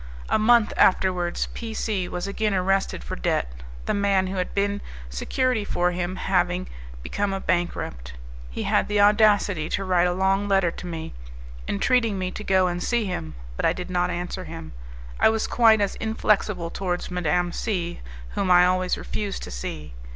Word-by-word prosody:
A - - +3
month 225 0 +4
afterwards 180 -2 +2
P 225 -2 -6
C 200 -6 -1
was 180 +1 -3
again 200 +1 -1
arrested 190 - 0
for - - -5
debt, - - -1 0.3
the - - 0
man 200 -2 +2
who 190 +1 -4
had 180 - -2
been 200 0 0 0.3
security 250 - 0
for 180 -3 0
him 180 +1 -3
having 180 -1 0 0.4
become 200 - -1
a 195 - -2
bankrupt. 170 - -2 0.4
He - - -4
had - - +2
the 210 0 +1
audacity 205 -6 +4
to 195 - -1
write 180 -2 +3
a 175 - 0
long 195 +2 +1
letter 195 -3 +3
to 180 - -8
me, 165 -2 -6 0.5
entreating 225 - +1
me 185 -1 -2
to 215 - -7
go 190 -2 +3
and 175 0 -2
see 235 +3 0
him, 80 - -4 0.2
but - - -4
I - - +3
did 180 0 -6
not 180 0 +1
answer 180 +1 -4
him. 165 0 -8 0.5
I - - +6
was 220 0 0
quite 225 -3 +4
as 200 - +1
inflexible 210 -5 0
towards 180 -1 -3
Madame 175 0 0
C, 175 -4 -3 0.3
whom 190 - -2
I 180 0 +7
always 185 0 +1
refused 205 -2 -4
to - - -7
see. 70 +4 -6
185 Hz, 180 wpm, -24 LUFS, 175-205 Hz, 0.5 s, I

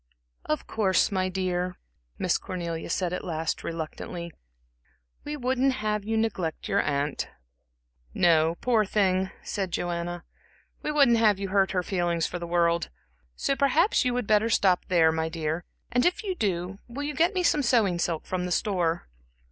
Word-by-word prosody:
"Of 155 - -1
course, 200 -3 +2
my 185 -1 0
dear," 180 -1 -2 0.4
Miss - - +1
Cornelia 170 -3 -5
said 180 +1 -1
at - - -3
last, 160 -2 -2
reluctantly, 170 +1 -5 0.9
"we 295 0 -4
wouldn't 260 +1 +1
have 210 -2 -1
you 225 +2 -1
neglect 190 -8 -2
your - - +2
aunt." 145 0 -1 0.8
"No, 165 - +3
poor 235 -4 +3
thing," 190 -2 +1
said 195 -3 -3
Joanna 175 0 -3 0.6
"we - - -2
wouldn't 275 -6 +5
have 215 -3 +4
you 195 0 -4
hurt 195 0 +3
her 180 -1 +1
feelings 175 -3 0
for 175 - -4
the 170 - -5
world. 170 0 +1 0.5
So 275 - 0
perhaps 285 - +3
you 250 -1 0
would 250 -2 -1
better 215 +2 +3
stop 185 -5 +3
there, 165 -3 +4
my 160 0 -1
dear; 160 +1 -3 0.3
and 245 0 +2
if 360 +4 +1
you 390 -3 -1
do, 195 - -2
will 255 +4 -5
you 295 +1 -2
get 340 +6 +2
me 365 - +1
some 300 -3 +3
sewing 225 -9 +2
silk 165 -2 -1
from 180 -1 -2
the - - -5
store?" 175 -4 0
185 Hz, 170 wpm, -27 LUFS, 170-230 Hz, 0.9 s, wouldn't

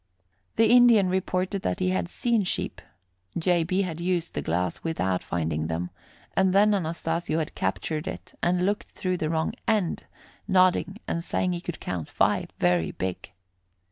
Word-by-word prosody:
The 225 - +5
Indian 240 -6 +7
reported 185 +1 -1
that 90 - -1
he 90 - +1
had 90 -2 -1
seen 235 -3 +1
sheep. 180 - -3 0.6
J. 175 0 +2
B. 185 +4 +1
had 170 -3 -4
used 175 -1 -1
the - - -2
glass 85 +1 -1
without 95 - 0
finding 80 -2 -2
them, 85 +2 -3 0.4
and 190 -1 +3
then 210 +2 +5
Anastasio 165 -2 -1
had 160 -2 -2
captured 150 +11 -2
it - - -7
and 180 +1 +2
looked 205 +2 -1
through 185 -1 -2
the 155 -2 -1
wrong 160 0 0
end, 210 -6 +1 0.4
nodding 185 0 +3
and 170 - -2
saying 180 +1 0
he 175 - -4
could 175 -2 -6
count 85 -4 -4
five, - - +1
very 90 -2 +2
big. 95 0 -4
170 Hz, 165 wpm, -26 LUFS, -, 0.6 s, Indian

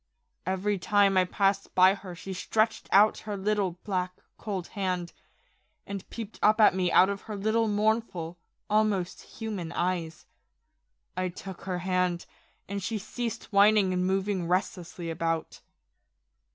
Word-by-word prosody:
Every 190 +2 0
time 200 +1 +3
I 185 -1 +4
passed 195 +1 0
by 185 +1 +7
her 190 -3 -8
she 190 +2 -7
stretched 215 +4 0
out 210 +2 +5
her 210 -1 -5
little, 195 -3 0
black, 185 -3 -2 0.2
cold 195 -5 -5
hand, 180 -4 -2 0.7
and 200 -1 -7
peeped 225 -2 -7
up 215 +1 +4
at 215 - +7
me 185 -1 0
out 185 - +6
of 200 0 -3
her 210 - -3
little 220 +3 +1
mournful, 205 -5 0 0.3
almost 210 -4 +1
human 205 -7 -6
eyes. 170 -3 -2 0.9
I 185 0 -1
took 185 +1 -9
her 185 -2 -2
hand, 180 -1 0 0.4
and 200 0 -4
she 220 +4 -2
ceased 230 +2 -5
whining 200 -1 +5
and 180 0 0
moving 190 -1 0
restlessly 175 -2 -2
about. 165 0 -2
190 Hz, 140 wpm, -28 LUFS, 180-210 Hz, 0.9 s, by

